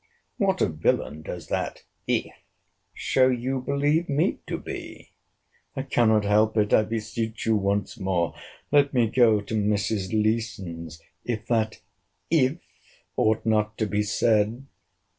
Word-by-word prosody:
What 190 -2 +1
a - - +3
villain 75 -1 -1
does 85 +1 -7
that - - -3 0.2
IF - - 0 0.6
show 130 -1 +2
you 130 +1 -1
believe 145 +5 +1
me 145 +2 +1
to - - -2
be! - - -8 0.6
I 135 - -2
cannot 110 -5 +3
help 110 +2 +3
it—I 105 0 +4
beseech 110 0 -4
you 110 - +3
once 100 -1 -1
more, 90 -4 0 0.4
let 140 -1 +4
me 120 -2 +4
go 110 -2 +4
to 100 - -7
Mrs. 105 -2 0
Leeson's, 100 -7 -2 0.2
if 115 -3 -3
that 110 -2 0 0.5
IF 145 -2 +3 0.6
ought 110 0 +1
not 110 -1 +1
to 110 - 0
be 105 0 0
said. 110 +3 +1
110 Hz, 135 wpm, -25 LUFS, 105-125 Hz, 0.6 s, it—I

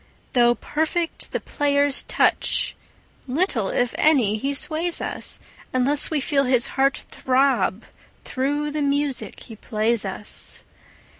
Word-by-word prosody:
Though 240 -1 +4
perfect 320 +5 -3
the - - -2
player's 285 -1 +1
touch, - - +1 0.5
little, 260 - 0
if 245 -1 0
any, 255 -10 +3
he 270 +6 -2
sways 330 +4 -1
us, - - -1 0.3
Unless 270 +3 +4
we 310 - 0
feel 275 0 +1
his 250 -2 +2
heart 275 0 0
throb 265 +1 +1 0.4
through 290 +3 -2
the 305 0 -3
music 285 -1 -1
he 225 - -10
plays 220 +1 -1
us. 195 +1 -7
275 Hz, 125 wpm, -22 LUFS, 245-295 Hz, 0.5 s, Though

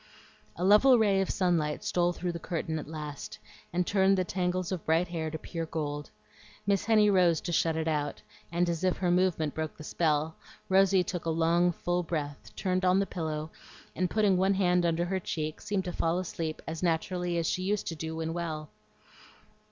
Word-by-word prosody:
A 175 - -4
level 210 +7 +7
ray 200 -3 +3
of 190 - -1
sunlight 170 -5 0
stole 175 0 +1
through 175 0 -3
the 170 - -6
curtain 165 -2 -3
at 150 - -8
last 150 -7 -7 0.3
and 180 +1 0
turned 195 0 +3
the 185 - +2
tangles 180 0 -1
of 180 -4 -3
bright 165 +3 +2
hair 160 -2 -3
to 160 - -4
pure 165 +1 -5
gold. 145 -2 -4 0.6
Miss 200 -2 +1
Henny 215 -1 +5
rose 175 -4 +4
to 175 - -4
shut 165 -1 +2
it 160 0 -1
out, 145 -2 -1 0.3
and 175 +1 +1
as 170 0 -2
if 185 -1 +2
her 180 -2 +1
movement 175 -4 +1
broke 155 -1 -4
the 155 - -9
spell, 155 0 0 0.3
Rosy 190 -1 +5
took 180 -2 -4
a - - 0
long 170 +2 +3
full 175 +1 -1
breath, 150 -4 -4
turned 185 -1 -1
on 185 0 +4
the 195 - +2
pillow, 155 -4 -4 0.4
and 180 +1 0
putting 205 -4 +3
one 190 +2 +3
hand 180 -2 +3
under 170 +1 +1
her 190 +1 -1
cheek, 155 -3 -4
seemed 195 -2 -2
to 180 - -4
fall 165 +1 0
asleep 165 -3 -4
as 160 0 -4
naturally 175 +1 0
as 165 - 0
she 185 - 0
used 200 +2 -1
to 165 - -3
do 160 +1 -5
when 160 0 -3
well. 160 -3 -4
175 Hz, 200 wpm, -29 LUFS, 160-185 Hz, 0.6 s, level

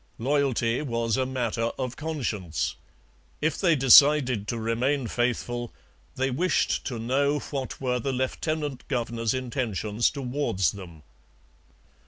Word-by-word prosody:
Loyalty 130 -2 +1
was 115 -5 -1
a 130 -1 0
matter 120 -3 -1
of 125 -2 -3
conscience. 115 - -3 0.7
If 155 0 0
they 170 -4 +4
decided 135 -4 +6
to 115 - -2
remain 120 +5 0
faithful, 120 0 -2 0.4
they 130 +1 0
wished 170 +6 +1
to 125 - -4
know 140 +5 +1
what 135 -3 -5
were 125 -2 0
the 135 +3 -2
lieutenant 140 +2 -2
governor's 115 -3 -1
intentions 120 -4 -1
towards 125 - -1
them. 85 -6 -11
125 Hz, 120 wpm, -26 LUFS, 115-140 Hz, 0.7 s, decided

